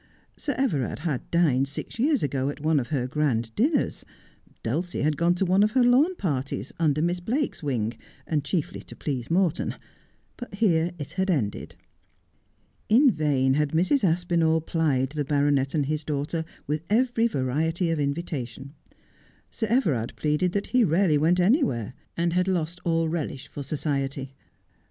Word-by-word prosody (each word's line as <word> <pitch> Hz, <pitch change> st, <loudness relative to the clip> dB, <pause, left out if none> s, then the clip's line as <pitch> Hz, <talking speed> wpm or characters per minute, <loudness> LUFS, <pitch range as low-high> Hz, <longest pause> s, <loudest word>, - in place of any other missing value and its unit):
Sir 285 Hz, -, -3 dB
Everard 160 Hz, -, 0 dB
had 145 Hz, -7 st, -2 dB
dined 140 Hz, -6 st, +2 dB
six 145 Hz, +10 st, -6 dB
years 285 Hz, +2 st, +2 dB
ago 135 Hz, -1 st, 0 dB
at 145 Hz, -, -6 dB
one 155 Hz, 0 st, +2 dB
of 125 Hz, -, -4 dB
her 135 Hz, -5 st, -1 dB
grand 125 Hz, -5 st, -1 dB
dinners. 285 Hz, +7 st, +1 dB, 0.6 s
Dulcie 175 Hz, -1 st, -2 dB
had 150 Hz, 0 st, +2 dB
gone 170 Hz, +3 st, +2 dB
to 190 Hz, -, 0 dB
one 185 Hz, +2 st, +3 dB
of 215 Hz, +1 st, +3 dB
her 255 Hz, -, +4 dB
lawn 270 Hz, +9 st, +4 dB
parties, 140 Hz, -, -3 dB
under 155 Hz, -2 st, +2 dB
Miss 175 Hz, +1 st, 0 dB
Blake's 250 Hz, +9 st, -2 dB
wing, 120 Hz, -7 st, -1 dB, 0.3 s
and 150 Hz, -3 st, -1 dB
chiefly 150 Hz, +2 st, -2 dB
to -, -, -12 dB
please 130 Hz, -5 st, -4 dB
Morton; 170 Hz, -1 st, +1 dB, 0.6 s
but 245 Hz, -5 st, -8 dB
here 175 Hz, -6 st, +2 dB
it 145 Hz, -3 st, -7 dB
had 190 Hz, +1 st, -1 dB
ended. 120 Hz, -, -1 dB, 1.1 s
In 255 Hz, +5 st, +6 dB
vain 140 Hz, -6 st, +1 dB
had 150 Hz, +1 st, 0 dB
Mrs. 185 Hz, -, +2 dB
Aspinall 165 Hz, -2 st, +2 dB
plied 150 Hz, -5 st, 0 dB
the 150 Hz, -1 st, -2 dB
baronet 140 Hz, 0 st, +1 dB
and 145 Hz, -3 st, +1 dB
his 155 Hz, +2 st, -2 dB
daughter 150 Hz, +3 st, -2 dB, 0.2 s
with 150 Hz, +2 st, -2 dB
every 235 Hz, +1 st, +2 dB
variety 160 Hz, -, 0 dB
of 165 Hz, -, -1 dB
invitation. 140 Hz, -3 st, -4 dB, 0.8 s
Sir 220 Hz, -, -2 dB
Everard 160 Hz, -, +1 dB
pleaded 155 Hz, +4 st, 0 dB
that 200 Hz, -, -1 dB
he 250 Hz, -1 st, +3 dB
rarely 165 Hz, -4 st, +3 dB
went 170 Hz, +4 st, +3 dB
anywhere, 175 Hz, -, +2 dB, 0.2 s
and 170 Hz, 0 st, +1 dB
had 180 Hz, +1 st, +1 dB
lost 175 Hz, -1 st, -1 dB
all 165 Hz, -1 st, +1 dB
relish 155 Hz, -5 st, -4 dB
for 145 Hz, -, -7 dB
society. 140 Hz, -2 st, -3 dB
160 Hz, 160 wpm, -26 LUFS, 140-185 Hz, 1.1 s, In